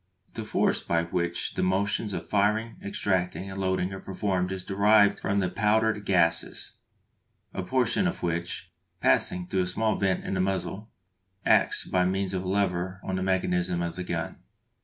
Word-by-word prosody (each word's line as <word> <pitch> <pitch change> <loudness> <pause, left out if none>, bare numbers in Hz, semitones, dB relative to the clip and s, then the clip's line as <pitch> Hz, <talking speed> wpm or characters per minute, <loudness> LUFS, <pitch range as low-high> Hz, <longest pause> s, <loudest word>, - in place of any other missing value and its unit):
The - - -5
force - - +1
by 85 -1 0
which 85 0 -2
the - - -2
motions 100 +2 0
of - - -5
firing, 105 +3 +1
extracting, 95 -1 -1
and 95 0 -5
loading 95 0 0
are 95 - -6
performed 95 -2 -1
is 95 -1 -4
derived 100 +1 +4
from 100 +1 -1
the 90 - +1
powder 110 +1 +2
gases, 90 -5 0 0.8
a - - -3
portion 125 - +1
of 180 - -4
which 85 +1 -3 0.3
passing 90 0 +2
through 95 +1 0
a 90 - -1
small 110 +3 0
vent 95 -2 0
in - - -2
the 95 - +1
muzzle 95 +3 -2 0.6
acts - - +3
by 90 -1 +2
means 95 0 -1
of 95 -1 -2
a - - -5
lever 95 -1 0
on 95 - -2
the 95 - -2
mechanism 90 -2 0
of 85 0 -3
the 90 - -4
gun. 85 -2 -4
95 Hz, 175 wpm, -27 LUFS, 90-100 Hz, 0.8 s, derived